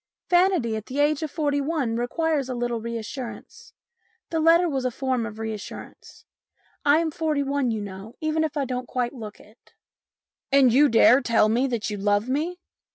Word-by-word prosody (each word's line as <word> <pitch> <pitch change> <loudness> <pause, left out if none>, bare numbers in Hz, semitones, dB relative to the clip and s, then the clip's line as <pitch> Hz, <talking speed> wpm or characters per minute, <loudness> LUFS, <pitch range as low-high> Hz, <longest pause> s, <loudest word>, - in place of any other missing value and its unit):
Vanity 350 - +3
at 215 -1 -6
the 265 - -6
age 295 +1 +2
of 315 - -3
forty 285 -2 -1
one 275 -6 -1
requires 280 +3 -1
a 255 - -3
little 240 -1 -2
reassurance. 235 +2 -7 0.6
The 325 - 0
letter 335 +2 +5
was 270 -5 -2
a 255 - +1
form 255 -2 -2
of 210 -1 -9
reassurance. 220 -2 -8 0.6
I 290 +1 +5
am 325 -1 0
forty 305 -2 -1
one, 275 -2 0
you 220 -2 -2
know, 200 +2 -9
even 310 0 0
if 305 -2 -3
I 280 - 0
don't 250 -1 -4
quite 245 0 -2
look 215 -5 -9
it." 215 +3 -21 0.4
" - - -66
And 270 -4 +5
you 290 +3 +5
dare 230 +2 +6
to - - -1
tell 230 -4 +3
me 245 +5 +2
that 235 -4 -2
you 205 - -3
love 205 +2 +1
me 310 +7 -1
260 Hz, 195 wpm, -24 LUFS, 230-300 Hz, 0.6 s, dare